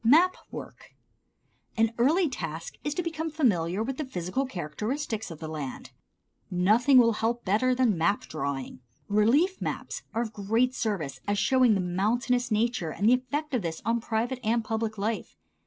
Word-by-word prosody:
Map 325 +10 +5
Work. - - -10 0.8
An 225 0 +3
early 320 +9 +4
task 165 - -5
is 295 0 -2
to 355 - -1
become 325 -1 -3
familiar 210 - +1
with 260 +2 -4
the 310 - -2
physical 260 - -2
characteristics 220 - -3
of 165 - -8
the 160 - -7
land. 150 -4 -6 0.6
Nothing 215 +10 +4
will 230 -2 +6
help 230 +2 -1
better 225 +7 +2
than 235 -8 +2
map 170 +6 +2
drawing. 135 -2 -4 0.3
Relief 255 - +3
maps - - -4
are 230 - +2
of 220 -2 -7
great 225 +6 +1
service 160 - -2
as 205 0 +1
showing 250 +2 +4
the - - 0
mountainous 225 +8 0
nature 220 -5 0
and 200 +7 0
the 240 - +7
effect 285 +4 -2
of 250 - +1
this 165 -3 -4
on 230 0 +1
private 235 +3 -1
and 230 +1 +1
public 220 -1 -2
life. 215 +2 -3
225 Hz, 170 wpm, -28 LUFS, 195-255 Hz, 0.8 s, the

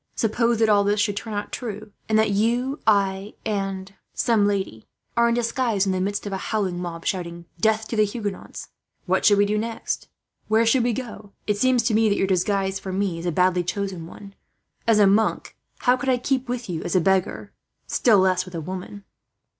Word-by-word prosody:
Suppose 230 +1 +1
that 220 0 +3
all 205 -1 +4
this 205 +1 +1
should 205 -1 +1
turn 215 +1 -5
out 205 - -4
true, 215 -3 -6 0.2
and 220 - +3
that 220 -1 +3
you, 240 +7 0
I, 200 -1 +1
and 195 -2 -2
and - - -24 0.2
some 220 -4 +2
lady 190 - -3 0.3
are 235 0 +4
in 235 - +1
disguise 230 -3 0
in 195 - +1
the 185 0 -1
midst 200 +2 -2
of 200 - -4
a - - -1
howling 190 -4 -2
mob 165 -2 -6
shouting, 170 -2 -3
'Death 220 +3 +2
to - - -3
the 215 - +4
Huguenots!' 205 -2 -5 0.4
What - - +1
should 205 -2 +6
we 205 - +4
do 210 +1 0
next? 230 +1 -4 0.4
Where 220 +1 +3
should 235 +2 +3
we 240 - +2
go? 215 -5 -7
"It 210 -1 0
seems 255 0 +3
to 225 - +1
me 220 0 +4
that 200 - +1
your - - +2
disguise 195 +1 0
for 190 - -6
me 185 -3 -1
is 170 - -4
a - - +1
badly 180 +1 +2
chosen 180 -1 -4
one. 200 +3 -12 0.5
As 225 -2 +5
a 210 - +6
monk, 205 +3 +1 0.3
how 250 - +4
could 265 +1 -2
I 255 - +3
keep 260 0 -1
with 245 -1 -3
you 170 -4 -3
as 175 - -3
a - - +6
beggar, 190 +1 0 0.3
still 225 -4 +3
less 185 -1 +3
with 185 -1 -10
a - - -2
woman?" 185 +4 -7
205 Hz, 215 wpm, -23 LUFS, 190-225 Hz, 0.5 s, should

